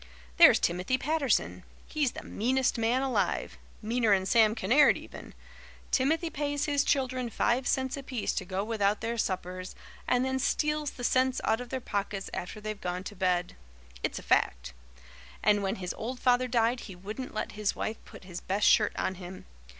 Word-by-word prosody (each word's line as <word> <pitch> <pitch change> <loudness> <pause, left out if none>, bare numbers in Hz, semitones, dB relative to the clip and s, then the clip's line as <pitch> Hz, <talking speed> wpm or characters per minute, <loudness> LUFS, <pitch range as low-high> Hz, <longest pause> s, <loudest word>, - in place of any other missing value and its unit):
There's - - +9
Timothy 180 +9 0
Patterson. 290 -1 0 0.2
He's 295 -5 -1
the - - -8
meanest 260 +4 0
man 240 +4 +1
alive 265 -2 -1 0.2
meaner'n 215 -4 +2
Sam 220 +1 +4
Kinnaird 270 +6 +4
even. - - -11 0.6
Timothy 320 +5 +1
pays 290 0 -1
his 285 -1 +2
children 255 -4 0
five 245 +3 0
cents 260 -1 0
apiece 260 -5 -3
to - - -2
go 190 +1 -3
without 210 -2 0
their 230 +1 -2
suppers, 185 -2 -3 0.3
and 250 +1 +2
then 265 0 -1
steals 300 +2 0
the 250 - -10
cents 255 +1 +2
out 225 +2 +1
of 245 - -8
their 260 - -3
pockets 200 -4 -3
after 180 +5 -5
they've 215 -1 -6
gone 180 +1 -3
to 205 - -8
bed. 180 -1 0 0.5
It's - - -2
a - - -7
fact. - - +1 0.7
And 205 0 +4
when 195 -1 -1
his 180 -1 -4
old 245 +3 -5
father 250 0 +3
died 240 0 +1
he 195 - -9
wouldn't 210 +8 -7
let - - -3
his 210 -1 -1
wife 220 +1 -4
put - - -13
his 180 -2 -8
best 200 +2 0
shirt 210 -2 +5
on - - -1
him. 180 +1 -9
230 Hz, 175 wpm, -29 LUFS, 195-260 Hz, 0.7 s, There's